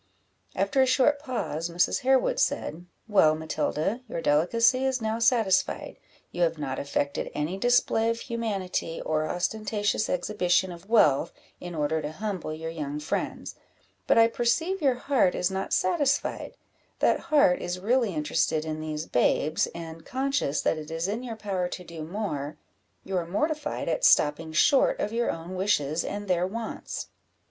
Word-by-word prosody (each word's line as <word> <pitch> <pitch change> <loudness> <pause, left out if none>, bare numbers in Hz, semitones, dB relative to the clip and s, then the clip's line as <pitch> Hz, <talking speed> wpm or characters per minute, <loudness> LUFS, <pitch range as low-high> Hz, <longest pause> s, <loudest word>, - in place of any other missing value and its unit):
After 275 -3 +2
a 260 - +4
short 270 +3 +3
pause, 230 - -3
Mrs. 170 +1 +1
Harewood 270 - +2
said 175 - -1 0.2
"Well, 175 -8 +4
Matilda, 160 +7 -2
your - - -3
delicacy 230 - +3
is 265 -1 +1
now 220 0 -2
satisfied 225 -5 +1 0.3
you 175 - -4
have 165 -1 +2
not 135 -3 -3
affected 140 0 -2
any 150 +5 -2
display 235 -1 +3
of 230 0 -2
humanity, 200 -8 -3
or 155 0 -1
ostentatious 205 +3 -1
exhibition 180 0 +1
of 175 +3 -12
wealth, 165 -9 +4 0.3
in 175 -1 -7
order 155 +1 0
to 150 +1 -5
humble 195 -4 -4
your 160 +1 -5
young 150 -2 -4
friends; 150 - -3 0.5
but - - +4
I 225 0 +7
perceive 320 +12 0
your 270 -4 +3
heart 250 -7 +2
is 180 +2 0
not 190 0 -3
satisfied; 285 - 0 0.4
that - - +2
heart 285 -3 +4
is 175 +1 -3
really 225 -1 +1
interested 155 +1 0
in 155 0 -4
these 155 0 -4
babes, 150 +4 +1
and, 165 -1 -9
conscious 265 - -1
that 160 - 0
it 150 - -9
is 165 +2 -2
in 215 +4 -2
your 240 -3 -6
power 195 -4 -2
to 180 - -7
do 170 -2 -9
more, 155 -5 -4 0.5
you 190 - -4
are 170 -2 -2
mortified 300 - -2
at - - -1
stopping 160 - +4
short 270 - +4
of 210 - -2
your 235 +1 0
own 165 +2 -5
wishes 170 -5 +1
and 205 0 -5
their 180 -1 +1
wants." 225 +3 -5
185 Hz, 160 wpm, -27 LUFS, 160-235 Hz, 0.5 s, I